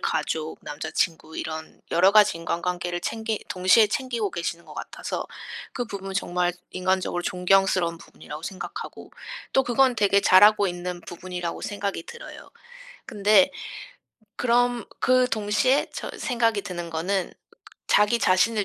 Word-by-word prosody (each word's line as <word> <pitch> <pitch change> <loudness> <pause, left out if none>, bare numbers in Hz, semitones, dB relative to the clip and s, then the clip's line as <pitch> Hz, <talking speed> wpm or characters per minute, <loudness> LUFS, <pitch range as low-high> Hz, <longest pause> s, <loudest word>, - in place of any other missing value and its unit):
가족, 160 0 -2
남자 155 +2 -6
친구 160 -2 -1
이런 160 0 -6
여러 185 +4 +5
가지 210 -5 +6
인간관계를 175 +1 -2
챙기 220 +1 -3
동시에 185 +5 +5
챙기고 235 -2 -2
계시는 170 0 -4
것 - - -12
같아서 - - -5 0.5
그 245 - -3
부분은 195 -2 -6
정말 175 -1 0 0.2
인간적으로 185 -1 -1
존경스러운 180 -1 +2
부분이라고 150 -1 -11
생각하고. 185 +2 -7 0.4
또 265 - +5
그건 255 +1 +3
되게 200 -1 +4
잘하고 205 +2 +6
있는 175 0 -5
부분이라고 175 0 -6
생각이 200 -4 -3
들어요. - - -11 0.6
근데 205 -2 +4 0.9
그럼 245 0 +2 0.2
그 255 0 +4
동시에 225 +5 +1
저 - - -5
생각이 230 -5 0
드는 175 -2 -6
거는 180 +4 -1 0.6
'자기 210 +3 +4
자신을 200 +3 +3
190 Hz, 320 characters per minute, -25 LUFS, 175-215 Hz, 0.9 s, 가지